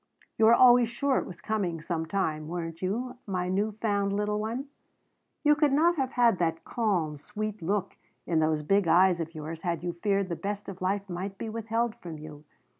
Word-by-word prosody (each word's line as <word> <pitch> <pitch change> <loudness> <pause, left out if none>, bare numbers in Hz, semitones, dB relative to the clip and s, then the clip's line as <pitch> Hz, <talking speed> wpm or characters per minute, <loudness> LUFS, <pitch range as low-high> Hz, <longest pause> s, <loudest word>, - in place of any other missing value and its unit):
You 220 - +6
were 230 +1 +8
always 245 -2 +6
sure 265 +3 +1
it - - -5
was 175 -2 -10
coming 190 -7 -1
some 160 0 -3
time, 155 -5 -1
weren't 165 -1 -5
you, 245 +7 -2
my 180 -2 -1
new 205 +3 0
found 200 -2 0
little 210 +1 0
one? 230 +5 -3 0.8
You 295 0 +6
could 295 -1 +2
not 330 +5 +4
have 265 -2 -1
had 235 -6 +4
that 165 -1 0
calm, 180 -10 -1
sweet 210 +5 -5
look 195 +3 -2 0.3
in 165 -2 +1
those 155 -1 +1
big 195 +3 +2
eyes 175 +1 +5
of 165 0 -5
yours 155 +1 -6
had 170 -3 -2
you 175 -1 -2
feared 195 +2 0
the 170 - -2
best 205 +3 -4
of 190 -2 -8
life 195 +2 -1
might 190 +2 -5
be 225 - -5
withheld 225 +1 -1
from 165 -3 -8
you. 150 -1 -10
195 Hz, 200 wpm, -28 LUFS, 170-220 Hz, 0.8 s, were